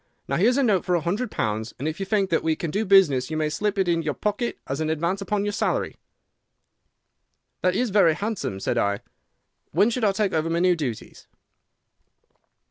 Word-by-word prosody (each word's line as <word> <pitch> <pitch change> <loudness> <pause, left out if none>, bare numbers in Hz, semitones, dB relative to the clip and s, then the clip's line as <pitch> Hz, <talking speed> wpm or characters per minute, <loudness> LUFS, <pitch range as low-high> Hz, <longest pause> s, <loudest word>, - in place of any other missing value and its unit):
Now, - - 0
here's 235 +9 +3
a 280 - +3
note 205 -7 +2
for 180 -1 +1
a 170 - +1
hundred 205 +10 -2
pounds, 110 - -3
and 140 - -3
if 155 +3 -4
you 195 - -3
think 200 -4 +1
that 165 - +2
we 160 -1 +1
can 160 0 -4
do 210 +5 -1
business 170 -11 +4
you 155 - -3
may 155 - 0
just 150 - -4
slip 210 -1 -1
it 190 -2 +1
into 165 -2 +1
your 150 - -1
pocket 210 +3 -2
as 135 +3 -3
an 155 - -1
advance 170 +5 -1
upon 200 +1 -1
your 205 - 0
salary.' - - -1 1.7
"'That 185 0 +2
is 245 0 0
very 185 -6 +4
handsome,' 200 - -3
said 120 +4 -1
I. 100 -2 0 0.7
'When 215 +4 +4
should 245 0 -2
I 205 - +4
take 195 0 -1
over 160 0 0
my 165 - 0
new 180 +1 +3
duties? 130 -9 -6
180 Hz, 215 wpm, -24 LUFS, 155-205 Hz, 1.7 s, business